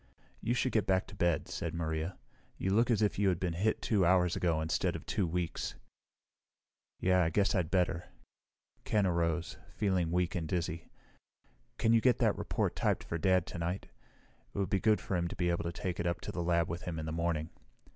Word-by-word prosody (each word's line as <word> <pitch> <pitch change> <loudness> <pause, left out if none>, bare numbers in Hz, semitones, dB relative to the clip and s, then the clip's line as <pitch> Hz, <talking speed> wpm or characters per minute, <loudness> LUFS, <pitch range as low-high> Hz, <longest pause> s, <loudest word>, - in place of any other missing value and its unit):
"You 120 - 0
should 125 +1 +1
get 110 -4 +1
back 95 -1 +2
to - - -12
bed," 85 -3 +1
said 85 -1 -4
Maria. 80 +1 -2 0.4
"You 95 - -1
look 115 +4 +3
as 110 -2 +3
if 105 - +1
you 100 -1 +4
had 90 -2 0
been 90 -2 -1
hit 105 +6 0
two 105 -4 +2
hours 90 0 +4
ago 85 -3 +1
instead 80 0 0
of - - -7
two 95 - 0
weeks." 85 0 -2 1.2
"Yeah, 90 0 +3
I 80 - +2
guess 100 +3 +2
I'd 90 -4 0
better." 90 -2 +1 0.8
Ken 105 -2 +2
arose, 85 -1 0 0.2
feeling 95 -5 +1
weak 90 0 +1
and 80 -3 -2
dizzy. 85 -1 -3 0.9
"Can 115 - +3
you 115 - +5
get 125 -1 +4
that - - +2
report - - -1
typed - - +1
for 80 - -4
Dad 95 0 +3
tonight? 85 +2 -4 0.7
It - - -6
would 100 -1 -1
be 95 - +3
good 110 +1 +3
for 95 - -3
him 85 -1 0
to - - -6
be 85 -1 +1
able 85 - -1
to 85 - -1
take 90 +1 -4
it 85 0 -1
to - - -4
the 90 - -3
lab 85 -1 +2
with 85 +1 -4
him 90 -3 -4
in 80 - -4
the 80 - -3
morning." 80 -1 -1
90 Hz, 210 wpm, -32 LUFS, 85-95 Hz, 1.2 s, you